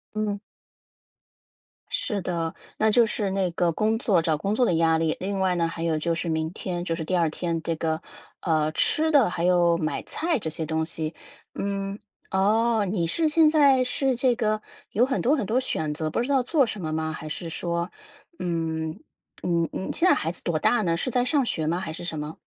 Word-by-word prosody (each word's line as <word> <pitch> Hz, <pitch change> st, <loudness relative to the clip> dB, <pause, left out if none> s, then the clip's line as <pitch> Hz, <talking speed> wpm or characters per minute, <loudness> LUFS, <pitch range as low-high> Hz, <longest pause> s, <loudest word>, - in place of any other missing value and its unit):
嗯。 210 Hz, -1 st, -1 dB, 1.5 s
是 210 Hz, -6 st, -1 dB
的， 170 Hz, -2 st, -2 dB, 0.2 s
那 220 Hz, 0 st, +4 dB
就 235 Hz, +1 st, +5 dB
是 210 Hz, -2 st, -1 dB
那 190 Hz, -2 st, 0 dB
个 170 Hz, 0 st, +2 dB
工 220 Hz, +5 st, +1 dB
作 195 Hz, -7 st, +3 dB
找 160 Hz, -2 st, +1 dB
工 200 Hz, +7 st, -1 dB
作 250 Hz, -, +3 dB
的 170 Hz, -, +2 dB
压 160 Hz, 0 st, +3 dB
力。 160 Hz, -1 st, +1 dB
另 195 Hz, +1 st, -2 dB
外 185 Hz, -1 st, +2 dB
呢， 170 Hz, -1 st, +1 dB
还 165 Hz, 0 st, -5 dB
有 160 Hz, -2 st, +1 dB
就 170 Hz, +2 st, 0 dB
是 165 Hz, +1 st, -3 dB
明 160 Hz, 0 st, -1 dB
天 175 Hz, -1 st, -4 dB
就 165 Hz, -, -1 dB
是 165 Hz, -1 st, -4 dB
第 185 Hz, +3 st, 0 dB
2 165 Hz, -2 st, +3 dB
天， 165 Hz, 0 st, -2 dB
这 165 Hz, -1 st, -2 dB
个， 160 Hz, 0 st, -1 dB, 0.4 s
呃， 155 Hz, -2 st, +1 dB
吃 315 Hz, -, +1 dB
的 275 Hz, -, +5 dB
还 170 Hz, -1 st, -2 dB
有 175 Hz, -2 st, +4 dB
买 155 Hz, -2 st, -2 dB
菜 330 Hz, -4 st, -1 dB
这 160 Hz, -6 st, -3 dB
些 160 Hz, 0 st, -2 dB
东 160 Hz, 0 st, 0 dB
西。 160 Hz, -1 st, -4 dB, 0.4 s
嗯， 195 Hz, 0 st, -3 dB, 0.3 s
哦， 215 Hz, +3 st, +3 dB
你 175 Hz, -5 st, 0 dB
是 315 Hz, -, +1 dB
现 310 Hz, 0 st, +5 dB
在 280 Hz, -4 st, +5 dB
是 260 Hz, 0 st, 0 dB
这 250 Hz, 0 st, +3 dB
个 215 Hz, -2 st, 0 dB, 0.3 s
有 235 Hz, +4 st, +3 dB
很 270 Hz, -, -1 dB
多 280 Hz, +6 st, +3 dB
很 225 Hz, -9 st, -2 dB
多 245 Hz, +4 st, +2 dB
选 160 Hz, -11 st, -2 dB
择， 155 Hz, 0 st, -2 dB
不 230 Hz, -, -1 dB
知 245 Hz, -, -1 dB
道 270 Hz, -2 st, +3 dB
做 270 Hz, +1 st, +2 dB
什 215 Hz, -, -5 dB
么 155 Hz, -3 st, -3 dB
吗？ 160 Hz, 0 st, -1 dB
还 155 Hz, -, -7 dB
是 165 Hz, +2 st, -5 dB
说， 170 Hz, +1 st, -2 dB, 0.5 s
嗯， 160 Hz, -2 st, -2 dB, 0.4 s
嗯， 170 Hz, -2 st, +1 dB
嗯 190 Hz, -, -3 dB
现 365 Hz, -, +3 dB
在 -, -, +7 dB
孩 165 Hz, +2 st, -1 dB
子 -, -, -10 dB
多 165 Hz, -2 st, 0 dB
大 235 Hz, +7 st, +3 dB
呢？ 170 Hz, -2 st, +1 dB
是 255 Hz, -, -2 dB
在 245 Hz, +1 st, +2 dB
上 275 Hz, 0 st, +2 dB
学 160 Hz, -7 st, -1 dB
吗？ 170 Hz, +3 st, +1 dB
还 160 Hz, -, -4 dB
是 170 Hz, -, -7 dB
什 160 Hz, -3 st, -4 dB
么？ 150 Hz, +1 st, -6 dB
180 Hz, 230 characters per minute, -25 LUFS, 165-225 Hz, 1.5 s, 在